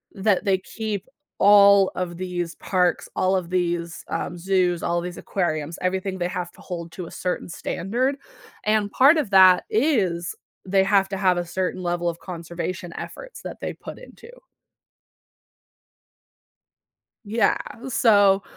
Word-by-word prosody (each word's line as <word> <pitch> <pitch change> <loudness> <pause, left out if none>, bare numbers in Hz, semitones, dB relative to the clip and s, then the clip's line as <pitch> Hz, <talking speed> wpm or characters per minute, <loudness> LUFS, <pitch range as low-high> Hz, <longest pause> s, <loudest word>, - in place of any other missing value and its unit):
That 200 -1 +1
they 195 -2 +3
keep 210 +1 -5 0.3
all 200 -1 +7
of 175 -2 -4
these 175 -2 -4
parks, 180 -3 0
all 185 +1 +2
of 180 -3 -2
these, 175 -2 -1
um, 175 - -3
zoos, 180 -2 +1
all 170 0 0
of - - -5
these 180 0 -6
aquariums, 160 -4 -2
everything 190 +1 -1
they 175 -1 -1
have 180 -2 -4
to - - -17
hold 170 -2 -6
to 180 - -6
a - - -12
certain 180 -1 -3
standard, 240 +11 -2 0.5
and 215 -1 +2
part 280 +5 +6
of 275 -10 -1
that 185 -2 +7
is 205 - +1 0.3
they 190 0 +3
have 195 -1 +3
to 195 - -3
have 185 -2 +2
a 175 - -2
certain 185 +1 -3
level 175 0 -1
of 170 0 -6
conservation 175 +1 -6
efforts - - -8
that - - -7
they - - -3
put - - -10
into. 480 -1 -14 3.0
Yeah, 220 +3 +2 0.3
so, 205 -5 +4
185 Hz, 150 wpm, -23 LUFS, 175-200 Hz, 3.0 s, all